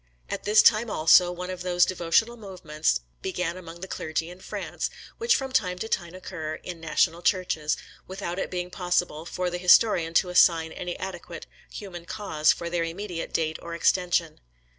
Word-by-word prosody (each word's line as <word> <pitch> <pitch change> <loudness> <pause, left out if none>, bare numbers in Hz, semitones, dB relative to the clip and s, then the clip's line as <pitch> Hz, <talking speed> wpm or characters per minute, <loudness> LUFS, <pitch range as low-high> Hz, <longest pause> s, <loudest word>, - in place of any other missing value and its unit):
At - - -4
this 210 +1 +6
time, 225 +1 +5
also, 175 +1 +5
one 180 +1 -5
of 185 -1 -6
those 180 -1 +3
devotional 185 +6 +1
movements 155 - -2 0.2
began 180 -2 -2
among 170 -2 -10
the 190 - -5
clergy 160 -1 -3
in 180 - -12
France, - - -4 0.3
which 465 +1 +3
from 265 -1 -2
time 180 -8 +1
to 220 - -4
time 175 -5 -2
occur 160 -4 -5
in 175 -1 -8
national 165 +2 +1
Churches, 175 -5 0 0.3
without 190 -1 -5
it - - -2
being 180 0 -4
possible 175 -3 -1
for 180 0 -2
the 175 - -3
historian 180 -2 +4
to 180 - +4
assign 165 -2 +4
any 175 +1 -5
adequate 175 -3 -7 0.2
human 175 -4 -8
cause 160 -6 +1
for 170 - -4
their 170 0 -1
immediate 170 +1 -5
date 160 -1 -1
or 170 0 -6
extension. 170 -2 +1
175 Hz, 175 wpm, -26 LUFS, 165-185 Hz, 0.3 s, this